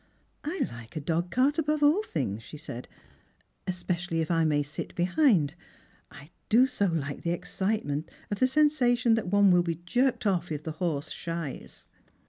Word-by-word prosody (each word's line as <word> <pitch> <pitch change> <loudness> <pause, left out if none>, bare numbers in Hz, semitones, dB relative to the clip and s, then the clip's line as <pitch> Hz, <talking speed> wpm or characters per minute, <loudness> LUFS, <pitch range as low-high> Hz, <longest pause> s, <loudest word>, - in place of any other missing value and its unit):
" - - -42
I 330 +5 -3
hke 115 -1 -5
a - - -1
dogcart 175 - +1
above 305 -1 +1
all 305 +8 +5
things," 125 - -3
she 150 - -10
said, 130 -5 -7 0.4
" - - -38 0.3
especially 175 -2 -2
if 160 +1 -1
I 165 -1 +3
may 145 -2 +2
sit 145 +1 -7
behind. 180 - +3 0.6
I 145 +4 -14 0.2
do 240 +4 +6
so 250 -6 0
like 145 -5 -2
the 170 - -2
excitement 180 -3 -2 0.2
of 205 - -2
the 255 - +5
sensation 255 -4 +3
that 225 -4 0
one 200 0 +5
will 180 0 +5
be 170 -1 -1
jerked 250 +5 +1
off 180 -4 +1
if 150 -1 -3
the 160 - -4
horse 155 -2 -2
shies." 165 -4 -6
175 Hz, 175 wpm, -28 LUFS, 155-245 Hz, 0.6 s, do